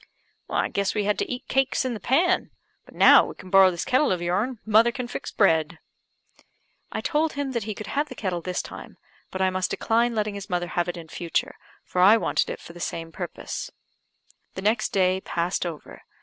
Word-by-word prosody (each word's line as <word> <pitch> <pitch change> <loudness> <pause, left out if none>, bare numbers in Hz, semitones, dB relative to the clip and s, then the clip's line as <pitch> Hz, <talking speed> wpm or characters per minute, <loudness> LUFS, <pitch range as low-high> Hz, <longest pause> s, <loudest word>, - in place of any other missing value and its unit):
"I - - 0
guess 200 -1 -1
we 210 - +1
had 205 +1 0
to - - -2
eat 250 - -5
cakes 270 0 +1
in 255 - -1
the 220 - -5
pan; 350 - +2 0.4
but - - -17
now - - +8
we - - -7
can 185 - -13
borrow 195 -1 +7
this 175 -2 -4
kettle 260 +1 +2
of 180 - 0
your'n, 195 +9 -1
mother 220 +2 +5
can 250 -1 -5
fix 245 - -6
bread." 160 -5 +2 1.1
I - - -3
told 310 0 0
him 280 -1 -3
that 235 -5 -2
he 215 -2 -4
could 215 - -7
have 290 +1 -2
the 255 - -8
kettle 185 -6 -3
this 180 +1 -3
time; - - -10 0.3
but 190 0 -2
I 190 - +2
must 185 0 -1
decline 235 +1 +1
letting 210 -1 -1
his 200 +1 -8
mother 175 -1 -1
have 175 0 -1
it 175 - -4
in 165 -1 -9
future, 170 +1 -2 0.3
for 180 - -1
I 205 +5 +7
wanted - - 0
it - - -5
for 170 - -12
the 175 - -12
same 165 -1 -4
purpose. - - -6 0.9
The 190 - -6
next 215 +1 +1
day 185 -1 +2
passed 175 +1 -1
over. 160 -3 -9
200 Hz, 215 wpm, -25 LUFS, 180-240 Hz, 1.1 s, now